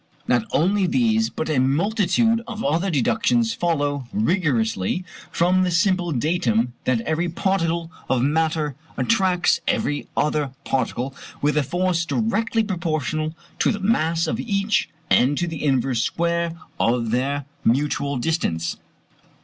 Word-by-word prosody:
Not 120 -3 +2
only 190 +5 +2
these 225 0 +2
but - - -4
a 155 -4 +1
multitude 205 - +2
of 225 -2 -5
other 165 +7 +1
deductions 225 - +2
follow 145 - -1
rigorously 160 - 0 0.2
from 180 +2 +2
the 185 - +2
simple 175 0 +2
datum 125 -5 +1
that 125 -3 +2
every 160 +6 -1
particle 170 -2 -1 0.2
of 130 -2 +2
matter 155 0 +1 0.2
attracts 190 -6 +2
every 145 0 0
other 150 -3 0
particle 130 0 -1 0.3
with 150 +1 +1
a 150 - +3
force 175 +3 0
directly 225 +4 0
proportional 155 -5 -2 0.2
to - - +3
the 215 - -3
mass 165 -5 +1
of 160 - -2
each 200 -1 0 0.2
and 135 +4 +4
to 175 - +1
the 165 -3 -5
inverse 130 -4 +1
square 170 +2 -1 0.2
of 115 -1 +1
their 135 +3 0 0.2
mutual 140 +2 +1
distance. 85 - -1
165 Hz, 135 wpm, -22 LUFS, 140-190 Hz, 0.3 s, and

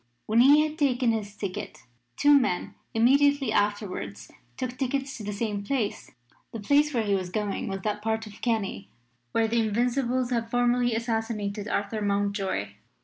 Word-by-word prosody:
When 220 +2 +2
he 290 +4 +7
had 310 +1 -9
taken 255 -4 +2
his 210 -2 -3
ticket 200 -3 -6 0.3
two 290 0 +5
men 255 -11 +2 0.2
immediately 275 +2 +3
afterwards 205 - -2 0.3
took 255 -1 -3
tickets 270 +1 -2
to 220 - -8
the 205 - -3
same 205 -1 -3
place. 230 -2 -2 0.4
The 225 - -6
place 290 +7 +3
where 235 -5 0
he 205 -2 0
was 185 -2 -1
going 210 +4 -2
was 195 -1 -4
that 210 +1 -2
part 220 0 -1
of 210 -1 -13
Kerry 200 - -2 0.4
where 225 - +2
the 235 +1 +1
Invincibles 245 +3 0
had 230 -2 -1
formerly 245 0 +2
assassinated 225 -3 -2
Arthur 205 +2 -2
Mountjoy. 200 - -1
225 Hz, 160 wpm, -27 LUFS, 205-250 Hz, 0.4 s, he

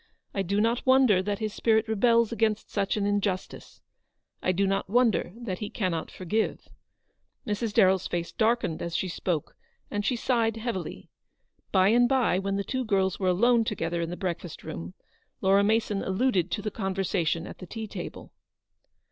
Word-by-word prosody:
I 195 - 0
do 200 +2 0
not 230 +3 +1
wonder 260 -7 +5
that 205 +1 -2
his 215 -1 -3
spirit 220 0 +2
rebels 230 +1 +3
against 220 -2 0
such 200 0 0
an 205 - 0
injustice. 200 -2 -2 0.6
I 185 - +2
do 195 +2 +1
not 195 0 -1
wonder 235 -5 +2
that 230 -6 -5
he 210 - -4
cannot 180 -6 -2
forgive." 210 +5 -2 0.8
Mrs. 210 +1 -2
DarrelFs 190 -3 +3
face 170 -1 -2
darkened 225 -7 0
as 170 -1 -4
she 190 - 0
spoke, 170 -3 -3 0.4
and 205 0 -1
she 250 +4 +1
sighed 230 -2 +1
heavily. 225 -5 -5 0.6
By 190 0 +4
and 240 +2 +4
by, 250 -9 +2
when 195 0 -2
the 200 - -1
two 260 +5 -2
girls 195 -4 +1
were 190 - 0
alone 230 +6 +4
together 170 -6 -2
in 165 - -2
the 175 - -5
breakfast 175 -2 -4
room, 85 +2 -7 0.4
Laura 195 +1 +4
Mason 215 -1 +1
alluded 190 -3 +1
to 210 - -3
the 215 - -2
conversation 190 -5 -1
at - - -10
the 185 - -9
tea 220 +3 -5
table. 215 - -8
200 Hz, 175 wpm, -27 LUFS, 185-225 Hz, 0.8 s, wonder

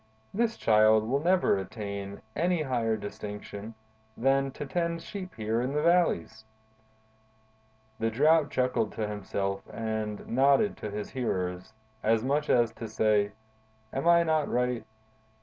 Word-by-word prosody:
This 230 +2 0
Child 110 0 +4
will 135 +4 +1
never 180 - +3
attain 100 0 -6
any 175 -1 +1
higher 115 -5 0
distinction 105 +1 -7 0.4
than 135 +2 +2
to 145 - -6
tend 170 +2 -2
sheep 185 -3 -7
here 110 +1 -1
in 130 +3 -2
the 150 +1 0
valleys.'" 170 - +2 1.6
The 115 - +1
Drought 150 +6 +4
chuckled 125 -4 0
to 110 -1 -2
himself 100 -1 -3
and 110 -2 -4
nodded 140 - +3
to 105 - -5
his 105 0 -5
hearers, 90 -6 -2 0.3
as 110 0 +2
much 145 +3 0
as 120 -2 +4
to 115 - -7
say: 105 -1 +2 0.6
"Am 135 +5 -1
I 170 0 +6
not 155 -2 +1
right? 125 -1 -1
115 Hz, 135 wpm, -29 LUFS, 105-150 Hz, 1.6 s, I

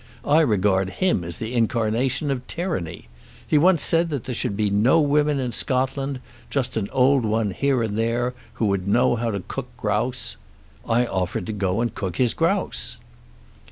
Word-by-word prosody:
I 150 +2 +4
regard 100 - +2
him 180 - 0
as 85 0 -6
the 110 +2 -5
incarnation 120 +4 +1
of 130 -2 -4
tyranny. 165 - -4 0.4
He 150 - +4
once 175 0 +4
said 170 +1 +3
there 135 -4 -4
should 115 -4 -2
be 105 -2 +1
no 115 +11 +4
women 150 -1 +2
in 125 -2 -2
Scotland, 135 +2 0 0.3
just 135 -3 -1
an 105 -3 -2
old 130 0 +3
one 110 -1 0
here 135 +4 +1
and 105 -2 -2
there, 115 +2 0 0.2
who 115 - -1
would 100 -2 0
know 120 +4 +3
how 115 0 -1
to 100 -3 -2
cook - - -5
grouse. - - -1 0.5
I 120 +2 +3
offered 90 -4 -2
to 110 - -4
go 100 +1 0
and 120 - -1
cook 95 -4 -4
his 125 0 +2
grouse! 170 +5 -1
120 Hz, 175 wpm, -23 LUFS, 105-140 Hz, 0.5 s, I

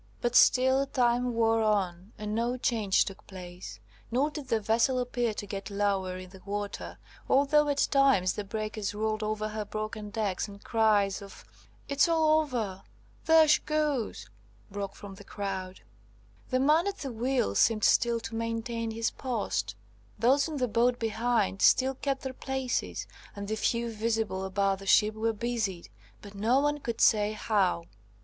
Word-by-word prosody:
But 240 0 -1
still 260 +2 +5
time 245 -1 +1
wore 225 0 +2
on, 195 -3 0
and 210 0 -4
no 235 +3 0
change 220 -6 +2
took 195 - -9
place, 175 - -9 0.3
nor 270 +6 +1
did 295 -3 -7
the 230 -3 +1
vessel 230 +5 +2
appear 245 -2 -1
to 205 - -5
get 200 0 -6
lower 200 -2 -1
in 185 0 -10
the 190 -1 -14
water, 205 0 -5 0.3
although 285 +2 +4
at 285 0 +2
times 270 -10 +4
the 210 - -4
breakers 215 0 -4
rolled 215 0 -1
over 215 0 -2
her 215 0 -4
broken 215 0 -5
decks, 205 -3 -2
and 200 0 -12
cries 210 -4 +2
of 200 -1 -12 0.4
"It's 285 +4 +2
all 315 -1 +4
over! 225 -11 -3 0.4
There 320 -1 +6
she 300 - +4
goes!" 300 - -1 0.5
broke 200 -1 -5
from 200 -1 -10
the 190 - -12
crowd. 190 -2 -5 0.7
The 255 - +1
man 305 +7 +3
at 400 0 -3
the 270 - -5
wheel 240 - 0
seemed 215 - +3
still 235 -1 +3
to 230 0 -7
maintain 230 0 -3
his 225 +1 -1
post; 200 - -3 0.4
those 270 +4 +3
in 310 -2 -5
the 255 -2 0
boat 240 +2 +2
behind 225 -3 0
still 265 +1 +4
kept 270 0 -3
their 265 -1 -4
places, 265 -1 -3 0.3
and 200 0 -6
the 220 - -1
few 235 +2 -1
visible 220 -3 -1
about 195 0 0
the 195 - -10
ship 210 +2 +4
were 225 +1 0
busied, 220 -5 -3 0.3
but 205 -1 -11
no 225 +6 +2
one 295 +1 0
could 235 -4 -4
say 210 -1 +4
how. 200 -5 0
225 Hz, 170 wpm, -29 LUFS, 200-255 Hz, 0.7 s, There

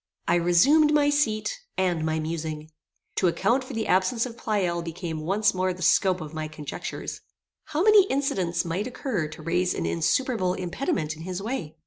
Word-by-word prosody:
I - - +3
resumed 235 - +4
my 290 -1 +4
seat 290 - 0 0.2
and 180 -4 +1
my 160 0 0
musing. 155 -1 -4 0.5
To 185 - +3
account 220 +9 +1
for 255 - -9
the 225 -1 -2
absence 190 +6 +2
of 240 -2 -7
Pleyel 190 -7 -1
became 165 -1 -5
once 205 +2 +2
more 185 0 0
the 180 0 -7
scope 185 +2 +3
of 155 0 -7
my 155 -1 -3
conjectures. 150 -2 -6 0.4
How 310 +3 -1
many 420 -2 +7
incidents 195 - 0
might 180 +7 -2
occur 240 - -2
to 155 - -11
raise 180 +2 0
an - - -2
insuperable 185 +2 +1
impediment 175 - -2
in 155 - -11
his 180 +2 -4
way? 200 - -4
185 Hz, 175 wpm, -26 LUFS, 165-240 Hz, 0.5 s, many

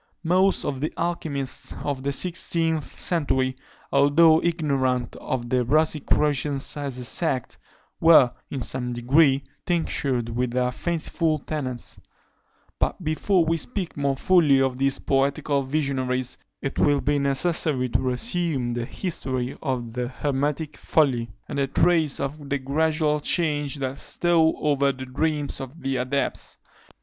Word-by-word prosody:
Most 185 +3 +2
of 135 -2 -3
the 155 - -1
alchymists 155 -6 -3
of 140 -2 -2
the 140 +1 -1
sixteenth 165 -1 0
century, 130 -6 0 0.4
although 155 +3 +5
ignorant 135 -7 0
of 120 -2 -3
the 125 -1 +2
Rosicrucians 150 0 +1
as 140 -3 -4
a 125 - -5
sect, 130 0 -1 0.4
were, 160 -7 +7 0.2
in 135 - -4
some 125 0 -2
degree, 135 +3 +3 0.2
tinctured 140 -8 -1
with 125 +2 -1
their 125 +1 0
fanciful 165 +1 -1
tenets: 135 -5 -5 0.8
but - - -1
before 165 +3 +1
we 165 +1 +1
speak 190 +1 -3
more 140 -1 0
fully 155 -5 +4
of 130 -1 0
these 135 0 +2
poetical 140 +1 0
visionaries, 130 -3 -1 0.3
it 135 - -3
will 145 -1 +3
be 145 0 +1
necessary 140 -1 +1
to - - +1
resume 135 - 0
the 120 0 -2
history 130 -7 -3
of 125 -5 -3
the 125 0 -2
hermetic 145 +3 -2
folly, 125 -7 +1 0.2
and 140 -2 -2
trace 160 -4 +3
the 140 0 -3
gradual 150 +2 +1
change 150 -3 +1
that 135 -1 -4
stole 165 -2 +2
over 140 -2 +2
the 130 0 -8
dreams 145 +2 -1
of 135 +5 -9
the 135 -1 -1
adepts. 130 +3 -2
140 Hz, 135 wpm, -24 LUFS, 130-160 Hz, 0.8 s, were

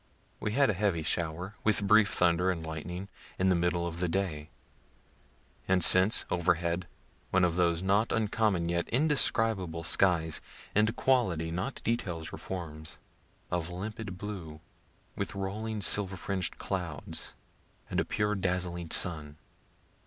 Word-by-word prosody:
We 105 - -2
had 135 -1 +4
a - - -2
heavy 95 -4 0
shower, 85 +4 -2
with 105 -1 +2
brief 105 0 +5
thunder 85 +1 +2
and 85 -3 -2
lightning, 90 +4 -5 0.3
in 95 +1 +2
the 90 - +4
middle 85 0 +1
of 85 0 -5
the 90 - 0
day; 80 -5 -2 1.2
and 90 -2 +3
since, 95 +6 +6
overhead, 85 0 0 0.4
one 95 0 +3
of 85 -2 +2
those 85 -1 +2
not 100 +4 +2
uncommon 105 -5 +1
yet 85 0 -1
indescribable 115 - +1
skies 85 -2 +2 0.3
(in 105 +1 +4
quality, 95 -13 +1
not 90 +11 -4
details 90 -9 -2
or - - -5
forms) 80 -4 -7 0.5
of 90 -1 -1
limpid 100 +2 -6
blue, 90 -7 -7 0.6
with - - -4
rolling 105 +3 -3
silver 95 -1 +3
fringed 95 -1 -3
clouds, 85 -7 -3 0.5
and - - -1
a - - +3
pure 105 0 0
dazzling 90 -3 -2
sun. 75 -5 0
90 Hz, 140 wpm, -30 LUFS, 85-105 Hz, 1.2 s, since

